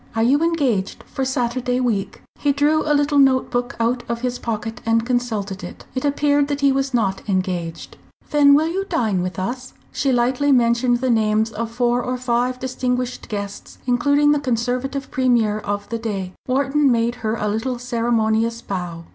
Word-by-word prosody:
Are 225 Hz, -, +2 dB
you 275 Hz, +6 st, +3 dB
engaged 280 Hz, -, 0 dB
for 270 Hz, -, -4 dB
Saturday 250 Hz, -1 st, -1 dB
week?" 225 Hz, -6 st, -2 dB, 0.2 s
He 290 Hz, -, +2 dB
drew 295 Hz, +2 st, +2 dB
a -, -, +4 dB
little 290 Hz, 0 st, +2 dB
note 265 Hz, -2 st, +3 dB
book 245 Hz, +2 st, -2 dB
out 240 Hz, +2 st, +1 dB
of 235 Hz, 0 st, -2 dB
his 250 Hz, -1 st, -2 dB
pocket 225 Hz, +1 st, -4 dB
and 230 Hz, 0 st, +1 dB
consulted 220 Hz, -6 st, -2 dB
it. 175 Hz, -, -9 dB
It 255 Hz, -, -3 dB
appeared 285 Hz, 0 st, +2 dB
that 285 Hz, -1 st, -2 dB
he 280 Hz, -1 st, +4 dB
was 270 Hz, 0 st, 0 dB
not 200 Hz, -6 st, 0 dB
engaged. 180 Hz, -3 st, -2 dB, 0.3 s
"Then 285 Hz, -1 st, +6 dB
will 310 Hz, +2 st, +3 dB
you 375 Hz, +4 st, -1 dB
dine 215 Hz, -, 0 dB
with 180 Hz, +1 st, -4 dB
us?" 245 Hz, +7 st, -4 dB, 0.2 s
She 275 Hz, -, 0 dB
lightly 255 Hz, +3 st, +2 dB
mentioned 240 Hz, -1 st, +3 dB
the 260 Hz, -1 st, +2 dB
names 220 Hz, 0 st, +2 dB
of 225 Hz, +1 st, -4 dB
four 240 Hz, +1 st, +1 dB
or 250 Hz, +1 st, -2 dB
five 250 Hz, 0 st, 0 dB
distinguished 250 Hz, -1 st, -2 dB
guests, 200 Hz, -1 st, -6 dB
including 285 Hz, +4 st, +3 dB
the 295 Hz, -, +3 dB
Conservative 255 Hz, +2 st, -2 dB
Premier 235 Hz, -5 st, +2 dB
of 205 Hz, -1 st, -4 dB
the 230 Hz, -, -3 dB
day. 195 Hz, -5 st, -4 dB
Wharton 275 Hz, +2 st, +2 dB
made 235 Hz, 0 st, +1 dB
her 220 Hz, 0 st, -1 dB
a 210 Hz, -2 st, -2 dB
little 225 Hz, +4 st, -1 dB
ceremonious 230 Hz, -2 st, 0 dB
bow. 175 Hz, -3 st, -5 dB
245 Hz, 180 wpm, -21 LUFS, 220-265 Hz, 0.3 s, Then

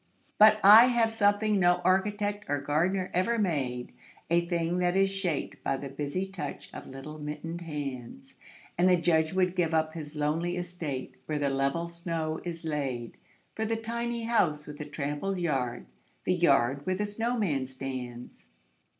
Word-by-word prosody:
But 215 Hz, 0 st, +8 dB
I 215 Hz, +4 st, +10 dB
have 235 Hz, -3 st, +2 dB
something 205 Hz, -1 st, +2 dB
no 175 Hz, -1 st, +5 dB
architect 205 Hz, +2 st, +1 dB
or 145 Hz, -, 0 dB
gardener 175 Hz, +7 st, 0 dB
ever 185 Hz, +7 st, +1 dB
made, 135 Hz, -, -1 dB, 0.4 s
A 170 Hz, 0 st, +3 dB
thing 170 Hz, 0 st, 0 dB
that 180 Hz, +1 st, +1 dB
is 195 Hz, 0 st, +3 dB
shaped 190 Hz, -6 st, -3 dB
by 135 Hz, -, 0 dB
the 140 Hz, 0 st, -6 dB
busy 145 Hz, +7 st, -3 dB
touch 185 Hz, -7 st, -7 dB
of -, -, -8 dB
little 145 Hz, +4 st, -9 dB
mittened 150 Hz, +3 st, -5 dB
hands: 135 Hz, -, -6 dB, 0.5 s
And 180 Hz, +1 st, +5 dB
the 180 Hz, -, +5 dB
Judge 160 Hz, -2 st, +2 dB
would 185 Hz, -1 st, +1 dB
give 170 Hz, -3 st, +1 dB
up 155 Hz, 0 st, +1 dB
his 155 Hz, -2 st, -7 dB
lonely 160 Hz, +4 st, -1 dB
estate, 170 Hz, -7 st, -5 dB
where 155 Hz, -, -1 dB
the 140 Hz, -1 st, 0 dB
level 140 Hz, +5 st, 0 dB
snow 165 Hz, -2 st, -3 dB
is 170 Hz, -1 st, -5 dB
laid 135 Hz, -6 st, -3 dB, 0.4 s
For 220 Hz, -, -3 dB
the 225 Hz, +1 st, 0 dB
tiny 235 Hz, +1 st, -3 dB
house 165 Hz, -10 st, +1 dB
with 150 Hz, 0 st, -9 dB
the 150 Hz, -, -4 dB
trampled 145 Hz, +6 st, -3 dB
yard, 130 Hz, -, -1 dB, 0.4 s
the 185 Hz, -, +1 dB
yard 140 Hz, -6 st, +3 dB
where 185 Hz, -, +1 dB
the 210 Hz, +2 st, -1 dB
snowman 205 Hz, -, -1 dB
stands. 130 Hz, -2 st, -7 dB
170 Hz, 165 wpm, -29 LUFS, 145-195 Hz, 0.5 s, I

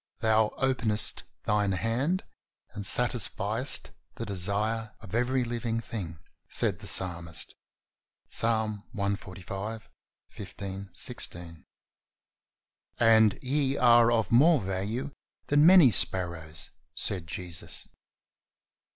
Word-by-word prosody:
Thou 110 Hz, -1 st, +2 dB
openest 120 Hz, -5 st, +4 dB, 0.2 s
Thine 105 Hz, -2 st, 0 dB
hand 125 Hz, -, -1 dB, 0.5 s
and 100 Hz, -, -7 dB
satisfiest 120 Hz, +1 st, 0 dB, 0.2 s
the 115 Hz, -, -6 dB
desire 105 Hz, +3 st, 0 dB
of 110 Hz, -3 st, -13 dB
every 125 Hz, +2 st, 0 dB
living 115 Hz, -1 st, -3 dB
thing," 95 Hz, -9 st, -7 dB, 0.3 s
said -, -, 0 dB
the -, -, -6 dB
Psalmist 85 Hz, -3 st, +2 dB, 0.7 s
(Ps. -, -, +2 dB
145: 105 Hz, -2 st, -4 dB, 0.4 s
15, 100 Hz, 0 st, -8 dB
16), 85 Hz, -2 st, -4 dB, 1.3 s
and 110 Hz, -3 st, +4 dB
"Ye 135 Hz, +1 st, 0 dB
are 120 Hz, -1 st, +5 dB
of 115 Hz, -2 st, 0 dB
more 150 Hz, +6 st, +5 dB
value 100 Hz, +8 st, -4 dB, 0.4 s
than 145 Hz, +2 st, +5 dB
many 175 Hz, -9 st, +7 dB
sparrows," 85 Hz, -6 st, -1 dB, 0.2 s
said 90 Hz, -4 st, -1 dB
Jesus. 85 Hz, -1 st, -1 dB
110 Hz, 95 wpm, -27 LUFS, 95-120 Hz, 1.3 s, many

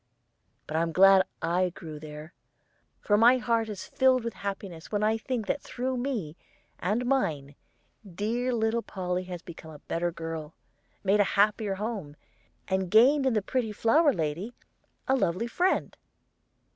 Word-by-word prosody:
But 155 Hz, -, -3 dB
I'm 165 Hz, 0 st, 0 dB
glad 190 Hz, +2 st, +6 dB, 0.2 s
I 180 Hz, +2 st, +1 dB
grew 160 Hz, -3 st, -9 dB
there; 150 Hz, +1 st, -10 dB, 0.7 s
for 205 Hz, 0 st, +2 dB
my 240 Hz, +3 st, +7 dB
heart 230 Hz, -2 st, 0 dB
is 205 Hz, -3 st, -6 dB
filled 260 Hz, -2 st, +2 dB
with 230 Hz, -, -3 dB
happiness 195 Hz, -4 st, -6 dB
when 210 Hz, 0 st, 0 dB
I 215 Hz, +1 st, +3 dB
think 225 Hz, 0 st, -3 dB
that 285 Hz, -, -1 dB
through 255 Hz, +1 st, -3 dB
me 245 Hz, -, -3 dB, 0.4 s
and 215 Hz, +7 st, 0 dB
mine 155 Hz, -, 0 dB, 0.6 s
dear 235 Hz, +6 st, -1 dB
little 230 Hz, 0 st, 0 dB
Polly 185 Hz, -3 st, -3 dB
has 180 Hz, -1 st, -7 dB
become 165 Hz, -2 st, -11 dB
a 155 Hz, -, -10 dB
better 175 Hz, +1 st, -1 dB
girl, 165 Hz, -2 st, -6 dB, 0.5 s
made 200 Hz, +1 st, +3 dB
a -, -, +6 dB
happier 205 Hz, 0 st, +2 dB
home, 200 Hz, -8 st, -5 dB, 0.5 s
and 190 Hz, -1 st, -1 dB
gained 265 Hz, +7 st, +5 dB
in 260 Hz, -, +2 dB
the 215 Hz, -3 st, +1 dB
pretty 240 Hz, -1 st, -1 dB
flower 290 Hz, +9 st, +3 dB
lady 170 Hz, -, -3 dB, 0.5 s
a 265 Hz, -, +3 dB
lovely 185 Hz, -3 st, 0 dB
friend." 355 Hz, +11 st, 0 dB
205 Hz, 155 wpm, -28 LUFS, 170-235 Hz, 0.7 s, my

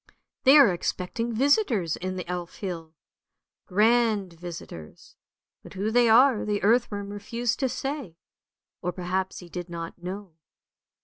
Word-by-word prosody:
They 270 Hz, +3 st, +9 dB
are 270 Hz, -10 st, +7 dB
expecting 185 Hz, +6 st, -3 dB
visitors 235 Hz, -, +2 dB
in 185 Hz, +1 st, -4 dB
the 180 Hz, -2 st, -5 dB
Elf 175 Hz, -1 st, -5 dB
hill, 165 Hz, -5 st, -6 dB, 0.7 s
grand 215 Hz, -2 st, +2 dB
visitors; 165 Hz, -, -10 dB, 0.5 s
but -, -, -13 dB
who 205 Hz, +3 st, -1 dB
they 240 Hz, 0 st, +4 dB
are 245 Hz, +1 st, +5 dB
the 205 Hz, -2 st, -2 dB
earthworm 205 Hz, -2 st, +1 dB
refused 220 Hz, +3 st, -2 dB
to 265 Hz, -2 st, +1 dB
say, 270 Hz, -, -4 dB, 0.6 s
or 180 Hz, -, -1 dB
perhaps 185 Hz, +2 st, -3 dB
he 175 Hz, -, -11 dB
did 175 Hz, 0 st, -7 dB
not 170 Hz, 0 st, -7 dB
know. 190 Hz, 0 st, -7 dB
200 Hz, 135 wpm, -26 LUFS, 180-235 Hz, 0.7 s, They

